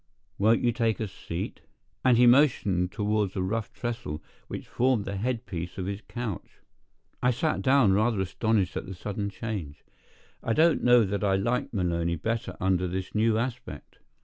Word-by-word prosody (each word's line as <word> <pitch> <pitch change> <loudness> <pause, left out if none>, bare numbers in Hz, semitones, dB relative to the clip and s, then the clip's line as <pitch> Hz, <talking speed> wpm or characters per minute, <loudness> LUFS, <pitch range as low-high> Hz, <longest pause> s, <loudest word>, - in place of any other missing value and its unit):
Won't 110 +3 +4
you 120 - +3
take 115 -3 0
a 110 - -2
seat?" 90 -1 -6 0.4
and 125 -2 +5
he 125 - +6
motioned 120 -9 +4
toward 105 -2 0
a 95 - -1
rough 110 +4 -2
trestle, 120 -11 -4 0.3
which - - -7
formed 125 -4 +1
the 100 - -4
head 120 +3 -2
piece 85 -2 -6
of 95 - -3
his 100 +2 -4
couch. 120 -6 -5 0.7
I 125 - +3
sat 150 +6 0
down, 130 -7 +4
rather 110 +1 +2
astonished 95 0 0
at - - -4
the 95 - -6
sudden 100 +2 -4
change. 100 -10 -6 0.6
I 115 - 0
don't 160 +5 +4
know 120 -1 +6
that 100 0 -2
I 95 -1 +3
liked 120 +6 0
Maloney 85 -4 0
better 110 +8 -3
under 95 -1 +1
this 95 +1 -4
new 110 +1 +2
aspect. 120 - -5
105 Hz, 175 wpm, -27 LUFS, 95-120 Hz, 0.7 s, he